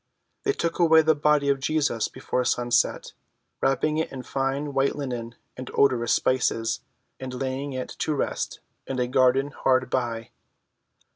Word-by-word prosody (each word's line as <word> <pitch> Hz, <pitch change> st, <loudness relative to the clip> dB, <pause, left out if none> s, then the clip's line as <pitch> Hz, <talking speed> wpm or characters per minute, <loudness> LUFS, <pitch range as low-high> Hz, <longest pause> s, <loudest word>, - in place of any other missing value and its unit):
They 410 Hz, -, +3 dB
took 170 Hz, -, -2 dB
away 160 Hz, -2 st, +6 dB
the 160 Hz, 0 st, +4 dB
body 150 Hz, -1 st, +2 dB
of 140 Hz, -1 st, +2 dB
Jesus 140 Hz, -5 st, 0 dB
before 125 Hz, -, -2 dB
sunset, 120 Hz, 0 st, +1 dB, 0.5 s
wrapping 150 Hz, +4 st, +1 dB
it 160 Hz, -, -2 dB
in 130 Hz, -2 st, -7 dB
fine 135 Hz, +3 st, -2 dB
white 135 Hz, 0 st, +1 dB
linen 120 Hz, -4 st, -5 dB, 0.2 s
and 130 Hz, 0 st, -7 dB
odorous 120 Hz, -4 st, +3 dB
spices, 115 Hz, -3 st, +1 dB, 0.4 s
and 130 Hz, -1 st, -6 dB
laying 135 Hz, +2 st, -3 dB
it 130 Hz, 0 st, -4 dB
to 155 Hz, -, 0 dB
rest -, -, -3 dB, 0.3 s
in 135 Hz, -, -3 dB
a 125 Hz, -, +1 dB
garden 130 Hz, +2 st, +3 dB
hard 130 Hz, -1 st, +1 dB
by. 115 Hz, -3 st, -2 dB
135 Hz, 150 wpm, -25 LUFS, 125-145 Hz, 0.5 s, away